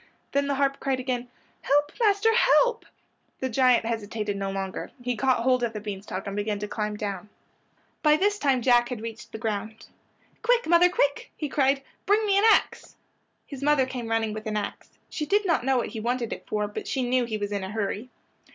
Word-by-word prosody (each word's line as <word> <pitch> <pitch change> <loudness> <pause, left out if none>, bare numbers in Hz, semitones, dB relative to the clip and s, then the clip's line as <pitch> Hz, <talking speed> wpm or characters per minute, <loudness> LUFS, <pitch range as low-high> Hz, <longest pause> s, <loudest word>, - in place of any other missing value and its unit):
Then 280 0 +1
the 280 - 0
harp 275 0 +1
cried 270 -2 -1
again, 250 -1 -2 0.3
"Help, 290 +1 +2
master, 435 0 +3
help!" 475 0 +3 0.5
The 260 - -2
giant 250 -1 +3
hesitated 215 -2 -3
no 195 0 -3
longer. 195 -1 -4
He 245 0 -2
caught 260 +1 +2
hold 255 0 +3
of 235 -2 -1
the 210 - -4
bean 205 -2 -6
stalk 195 -1 -6
and 200 -1 -4
began 205 0 -1
to 210 +1 -4
climb 210 0 -3
down. 205 -1 -5 0.7
By 300 -1 +5
this 410 +3 +1
time 265 -6 +2
Jack 240 -1 +4
had 250 -3 -4
reached 225 0 -8
the - - -6
ground. 220 0 -4 0.6
"Quick! 485 +1 +3
quick, - - -9
mother!" 345 +2 +6 0.5
he 300 - -2
cried. 275 0 +2 0.2
"Bring 425 +2 +3
me 400 -2 +2
an 420 - +3
ax." - - +1 0.5
His 275 -2 -9
mother 290 -2 +3
came 250 -3 -5
running 225 -1 0
with 215 +1 -6
an 215 0 -1
ax. 205 - -6
She 300 - -4
did 410 +5 +2
not 335 -8 +2
know 265 0 +2
what 240 - -1
he 225 - -6
wanted 240 +1 -1
it - - -10
for, 210 -1 -1
but 205 - -7
she 260 -3 -1
knew 250 0 +2
he 220 -2 -3
was 205 -1 -4
in 200 -2 -2
a 190 - -5
hurry. 215 +3 -3
245 Hz, 215 wpm, -26 LUFS, 215-280 Hz, 0.7 s, mother